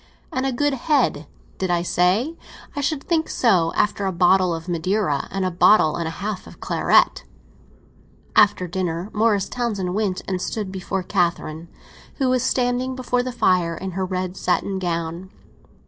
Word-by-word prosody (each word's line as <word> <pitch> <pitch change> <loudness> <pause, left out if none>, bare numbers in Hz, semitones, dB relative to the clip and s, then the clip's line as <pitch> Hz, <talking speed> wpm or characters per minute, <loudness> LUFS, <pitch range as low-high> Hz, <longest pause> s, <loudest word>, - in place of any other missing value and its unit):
And 260 +1 0
a - - 0
good 290 +3 +1
head, 255 - +1 0.3
did 190 - -1
I 175 -1 +1
say? 190 - +1 0.4
I 285 - -2
should 285 0 -1
think 325 -2 0
so—after 195 -1 +2
a - - 0
bottle 180 +1 +3
of 165 +1 -5
Madeira 175 -3 0
and 195 -1 -2
a 185 - 0
bottle 170 -3 +5
and 170 -1 -2
a 160 - -6
half 210 -3 -4
of - - -14
claret!" - - +2 1.1
After 200 -3 +4
dinner 175 +1 -3
Morris 210 -2 +2
Townsend 210 -7 -2
went 200 -3 -1
and 185 -2 -2
stood 205 -2 -3
before 190 0 -3
Catherine, 170 -3 -1 0.5
who 265 -3 0
was 255 -1 +2
standing 255 +1 0
before 250 -1 0
the 255 +1 -4
fire 180 -8 +2
in 190 0 -5
her 190 +2 -2
red 185 0 -3
satin 190 +1 -1
gown. 170 0 -3
190 Hz, 165 wpm, -22 LUFS, 175-240 Hz, 1.1 s, bottle